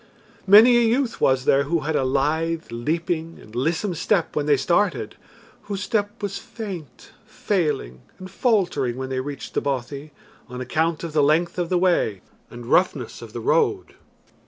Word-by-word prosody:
Many 225 +5 +8
a - - +4
youth 235 +1 0
was 130 -1 +2
there 140 0 +3
who 165 +2 0
had 155 +2 -2
a 140 - +2
lithe 160 +5 -1
leaping 165 +6 -2
and 110 - -16
lissom 165 - -1
step 175 +2 0
when 150 -1 -1
they 145 -2 +4
started 175 +9 0 0.5
whose 205 -1 -4
step 205 0 -2
was 200 -1 -3
faint, 185 - -9 0.2
failing, 155 - -2 0.2
and 185 -1 -10
faltering 185 - 0
when 130 0 -5
they 130 -1 -2
reached 140 +2 -6
the - - 0
bothy 140 +2 -4 0.4
on 125 0 -7
account 160 +6 -1
of 165 -2 -5
the 155 - +3
length 165 +5 +2
of 175 -1 -1
the 180 - +2
way 175 - +1 0.3
and 120 0 -10
roughness 180 +9 +1
of - - -10
the - - -6
road. 445 -5 +1
165 Hz, 170 wpm, -23 LUFS, 135-200 Hz, 0.5 s, Many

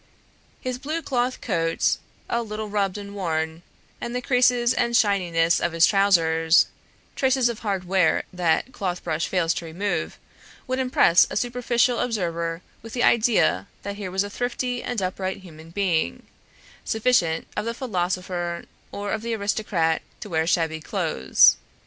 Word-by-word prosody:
His 255 -1 -4
blue 310 +4 -3
cloth 250 -1 -1
coat, 165 -6 0 0.3
a 235 - 0
little 215 -1 -5
rubbed 200 -2 0
and 200 0 -8
worn, 160 -4 -2 0.4
and 240 +1 -4
the 250 - -1
creases 250 -1 +3
and 235 -2 +2
shininess 175 -6 +2
of 170 - -1
his 165 0 +5
trousers, 165 -5 +4 0.5
traces 260 -2 +2
of 235 - -5
hard 195 -4 -2
wear 185 -2 +2
that 175 -3 +1
the 260 - -22
clothes 180 -6 -3
brush 160 +1 -2
fails 170 -3 +1
to 170 - -5
remove, 165 - -3 0.5
would 255 +1 -2
impress 250 -9 +4
a - - -3
superficial 245 0 +1
observer 170 -7 -2 0.2
with 225 - -10
the 245 - 0
idea 215 - +3 0.2
that 200 0 -5
here 200 -3 -5
was 190 +2 0
a 205 - -6
thrifty 245 +1 -2
and 235 -6 -3
upright 185 +1 -2
human 160 -2 -13
being, 165 - -1 0.6
sufficient 220 -8 +1
of 210 - -2
the 230 0 -3
philosopher 180 -6 -2 0.3
or 205 0 -4
of 220 - -2
the 230 0 -2
aristocrat 200 -6 0 0.2
to 210 - -8
wear 160 0 +1
shabby 160 -2 0
clothes. 65 - +3
195 Hz, 155 wpm, -24 LUFS, 170-235 Hz, 0.6 s, his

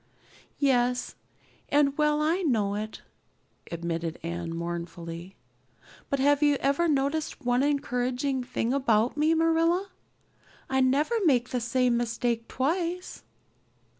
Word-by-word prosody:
"Yes, 250 -3 +1 0.6
and 285 -1 +3
well 300 0 +2
I 335 +5 +1
know 220 - +1
it," 215 +1 -5 0.7
admitted 170 -1 -3
Anne 170 0 -4
mournfully. 170 +1 -6 0.7
"But 280 - 0
have 285 +2 +3
you 290 -1 +4
ever 280 +5 +1
noticed 290 0 -1
one 245 +1 +2
encouraging 260 -1 0
thing 245 -1 -2
about 235 -4 +2
me, 310 +2 +3
Marilla? 330 +4 +2 0.8
I 265 0 +1
never 275 - +2
make 250 -5 +3
the 250 - -2
same 245 0 +1
mistake 235 0 -1
twice." 345 +6 -2
260 Hz, 115 wpm, -27 LUFS, 225-295 Hz, 0.8 s, you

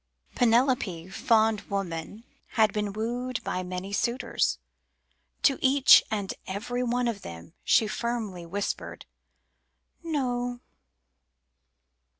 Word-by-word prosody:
Penelope, 230 -8 +2
fond 220 +1 +2
woman, 195 +1 -4 0.3
had 220 -3 +3
been 210 -1 -1
wooed 240 +4 -3
by 185 - -2
many 185 +2 -5
suitors; 240 +5 0 0.9
To 275 - +4
each 270 0 +7
and 205 -3 -2
every 230 +6 -3
one 245 0 0
of 220 -4 -3
them 85 - -10
she 225 - +4
firmly 215 -5 -3
whispered 195 +4 -4 1.0
"No." 245 -6 -2
220 Hz, 100 wpm, -27 LUFS, 195-245 Hz, 1.0 s, each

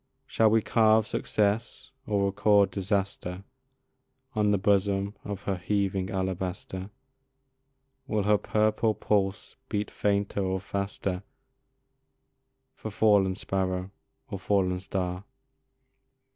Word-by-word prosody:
Shall 110 -1 +3
we 110 0 +3
carve 110 -1 +4
success 110 +6 -1 0.2
or 100 -3 +1
record 100 0 +3
disaster 95 -1 -2 0.9
On 105 -2 +2
the 105 - +3
bosom 100 0 +1
of 100 -2 -6
her 95 -2 -1
heaving 95 +1 -1
alabaster? 95 0 -3 1.2
Will 105 -2 0
her 105 0 +3
purple 110 0 +1
pulse 100 -1 -1
beat 105 -3 -2
fainter 100 0 0
or 95 0 0
faster 100 -1 -3 1.5
For 110 - -7
fallen 100 -3 +3
sparrow 95 -1 -2 0.4
or 100 -6 -5
fallen 95 -2 +1
star? 90 0 -3
100 Hz, 105 wpm, -28 LUFS, 95-105 Hz, 1.5 s, carve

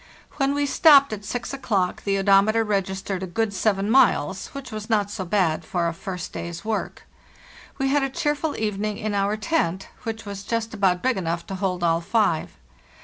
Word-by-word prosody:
When 275 0 +1
we 285 0 +1
stopped 280 -3 +6
at 205 -1 -6
6 245 +6 -4
o'clock 200 -9 -1
the 200 -1 +1
odometer 200 +3 +4
reg 200 -3 0
istered 190 0 -4
a 190 - -3
good 220 +3 -1
7 195 0 +1
miles, 210 - +3
which 275 -2 -9
was 215 +1 -6
not 205 -2 +1
so 195 - -4
bad 170 -4 +1
for 170 +1 -1
a 170 - -2
first 180 0 -6
day's 170 +3 -6
work. 220 -1 -3 0.7
We 270 -1 0
had 290 +1 +3
a 270 - 0
cheerful 295 0 -1
evening 210 -1 -2
in 215 -1 -3
our 200 +1 0
tent, 205 - -1
which 225 -1 -5
was 200 -1 -6
just 230 0 -2
about 190 -4 +1
big 260 -3 +2
enough 170 -2 -2
to - - -7
hold 185 -2 -2
all 165 0 +2
five. 200 -3 0
205 Hz, 195 wpm, -24 LUFS, 190-230 Hz, 0.7 s, stopped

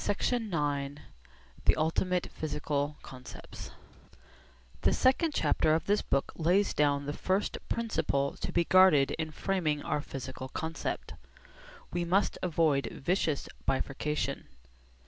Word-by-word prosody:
CHAPTER 245 +4 +1
IX 145 -9 -2 0.7
THE - - +5
ULTIMATE 175 +3 0
PHYSICAL 150 -1 -2
CONCEPTS 130 -1 -10 1.1
The - - +3
second 290 +4 +3
chapter 155 - +3
of 160 - -1
this 205 +1 +2
book 140 - 0
lays 180 +5 +2
down 145 -1 +2
the 145 - -3
first 190 +6 -1
principle 140 -11 0
to - - -4
be 170 - +3
guarded 185 -8 +6
in 160 -1 -1
framing 155 -3 -1
our 150 - -1
physical 130 -2 -7
concept. 160 +4 -4 0.8
We 175 0 0
must 185 +4 +1
avoid 160 -5 +2
vicious 160 -2 -1 0.2
bifurcation. 135 +2 -1
155 Hz, 120 wpm, -30 LUFS, 145-185 Hz, 1.1 s, guarded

